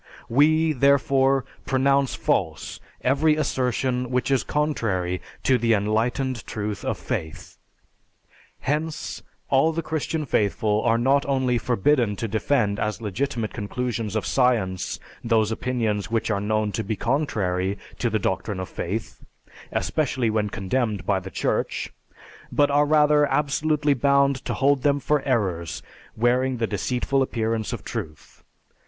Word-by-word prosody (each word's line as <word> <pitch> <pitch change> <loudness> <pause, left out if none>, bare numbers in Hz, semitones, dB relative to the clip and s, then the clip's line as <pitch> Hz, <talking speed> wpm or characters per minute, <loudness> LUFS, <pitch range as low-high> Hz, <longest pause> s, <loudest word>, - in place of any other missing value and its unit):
We, 155 +5 +4
therefore, 135 0 +3 0.2
pronounce 135 +1 +2
false - - -1 0.2
every 150 +4 +3
assertion 125 -3 -1
which 125 +2 0
is 135 - +2
contrary 110 - -1 0.2
to 130 -2 +3
the 115 -1 +3
enlightened 115 +4 0
truth 105 -1 -4
of - - -1
faith.... 80 0 -5 1.0
Hence, 155 +3 -2 0.3
all 135 +4 +4
the 165 +1 -3
Christian 155 0 -2
faithful 105 -2 +1
are 115 -1 +2
not 135 +4 +3
only 130 -3 +1
forbidden 120 -1 +2
to 115 - -3
defend 110 -1 0
as 105 0 -2
legitimate 115 +1 -2
conclusions 115 0 -3
of 110 - -1
science 115 -8 +1 0.2
those 115 -2 +2
opinions 110 -4 -1
which 115 0 0
are 100 -2 0
known 110 0 0
to 110 - -2
be 110 +2 -2
contrary 100 -8 -1 0.2
to 120 - +1
the 110 - +1
doctrine 95 0 -2
of 95 - -5
faith, 105 +6 -5 0.5
especially 130 -6 0
when 105 -1 0
condemned 105 -1 -2
by 100 -1 +2
the 95 +1 -8
Church, - - -2 0.6
but 145 -1 +3
are 145 +1 +3
rather 150 -1 +4
absolutely 150 +1 +1
bound 140 0 +3
to - - -2
hold 140 0 +2
them 145 +1 +2
for 150 +2 +1
errors 90 - -1 0.3
wearing 125 +3 +2
the 115 - 0
deceitful 125 +6 -1
appearance 115 -3 -1
of - - -5
truth. 75 -1 -7
125 Hz, 135 wpm, -24 LUFS, 105-140 Hz, 1.0 s, We